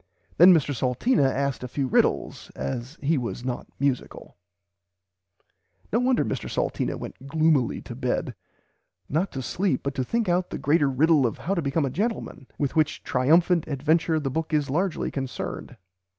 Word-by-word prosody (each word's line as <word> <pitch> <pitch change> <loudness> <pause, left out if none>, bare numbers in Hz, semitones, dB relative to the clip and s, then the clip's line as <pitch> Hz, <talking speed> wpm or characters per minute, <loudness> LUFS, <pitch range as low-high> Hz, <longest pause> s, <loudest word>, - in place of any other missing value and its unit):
Then 180 +3 +9
Mr 145 -5 +3
Salteena 135 - +2
asked 140 -1 -2
a - - -3
few 135 +2 -2
riddles 130 - 0
as 120 - -5
he 150 +1 +2
was 125 0 -5
not 125 -1 -4
musicle." 140 -2 -2 1.6
No 230 - +4
wonder 250 0 +2
Mr 130 - -3
Salteena - - -1
went 135 - -9
gloomily 155 -4 +2
to - - -8
bed, - - -2 0.7
not 170 +7 -1
to - - -7
[Pg - - -7
xiii] - - -5
sleep, 185 -7 +1
but 140 - -2
to 130 - -1
think 230 - -1
out 180 +1 +1
the - - -4
greater 145 0 +2
riddle 145 0 +3
of 115 - -5
how 190 - -2
to 175 - 0
become 145 +1 0
a 135 - -2
gentleman, 205 - -3
with 140 0 -1
which 155 -2 +1
triumphant 165 +6 +3
adventure 155 +3 +1
the 135 -3 -3
book 160 +2 -1
is 145 -3 0
largely 180 +4 -1
concerned. 135 -2 -5
145 Hz, 175 wpm, -25 LUFS, 130-170 Hz, 1.6 s, Then